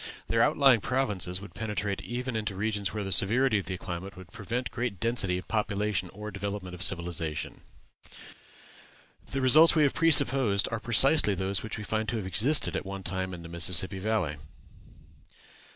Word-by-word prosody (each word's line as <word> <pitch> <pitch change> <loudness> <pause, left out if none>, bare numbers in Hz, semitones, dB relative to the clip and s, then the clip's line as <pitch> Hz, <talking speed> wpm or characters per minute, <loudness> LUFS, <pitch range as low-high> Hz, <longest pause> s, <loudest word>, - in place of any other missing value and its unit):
Their - - +1
outlying 135 -6 +4
provinces 100 -9 -1
would 100 - -12
penetrate 105 -2 -4
even 125 0 -5
into 105 -2 -3
regions 100 -2 -2
where 105 +2 -4
the 95 - -6
severity 110 +4 +3
of 100 - -9
the 95 - -4
climate 95 +2 -8
would 90 -1 -13
prevent 115 +3 -5
great 120 -5 -4
density 110 -5 -1
of 90 - -9
population 105 -3 -2
or 105 +2 -8
development 100 -2 -6
of 90 - -10
civilization. 85 -4 -1 1.7
The 135 - -3
results 155 +7 +6
we 155 - +3
have 140 - +1
presupposed 130 -10 +3
are 115 - -3
precisely 120 -1 +3
those 95 +1 -1
which 110 - -6
we 110 - -7
find 110 0 -3
to 115 - -2
have 105 - -5
existed 120 +11 +3
at - - -3
one 95 0 -8
time 95 -1 -4
in 85 -2 -9
the - - -9
Mississippi 90 +3 +3
Valley. 95 -7 -2
105 Hz, 170 wpm, -27 LUFS, 95-115 Hz, 1.7 s, results